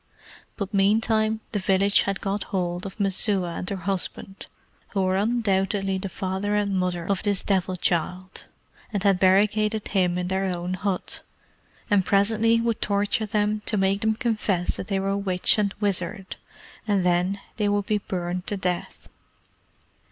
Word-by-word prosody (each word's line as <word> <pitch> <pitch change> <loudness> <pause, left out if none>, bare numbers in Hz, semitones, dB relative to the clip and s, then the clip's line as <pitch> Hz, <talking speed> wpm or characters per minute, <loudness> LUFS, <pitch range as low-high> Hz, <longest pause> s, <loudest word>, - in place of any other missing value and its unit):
But 200 -1 -4
meantime 215 +2 +2
the 210 - -1
village 195 +1 +3
had 195 - -3
got 200 0 -2
hold 180 0 -2
of 195 - -11
Messua 195 -2 +2
and 180 - -4
her 200 - -2
husband, 195 +1 -3 0.4
who 195 -2 -1
were 185 0 +1
undoubtedly 195 -3 0
the 195 0 -4
father 190 +3 -2
and 205 -1 0
mother 180 -2 -1
of 195 -1 0
this 205 -3 +2
Devil 190 -2 0
child, 180 +1 -2 0.5
and 200 -3 -2
had 195 -3 +3
barricaded 210 +3 +3
them 180 -3 +1
in 180 0 -2
their 190 +1 0
own 180 -1 -2
hut, 185 0 -2 0.7
and 205 -2 +3
presently 220 +4 +3
would 230 -1 -1
torture 205 +1 0
them 210 +1 0
to 215 - +1
make 195 +1 +1
them 220 -1 +2
confess 215 -7 0
they 195 -3 -2
were 195 +1 0
witch 195 +1 +1
and 200 -1 0
wizard, 195 -1 -2 0.5
and 200 -3 +1
then 180 +3 +1 0.2
they 210 -2 +1
would 205 -1 0
be 210 0 +1
burned 180 -1 -4
to 205 - -1
death. 180 -2 -3
195 Hz, 160 wpm, -25 LUFS, 185-210 Hz, 0.7 s, village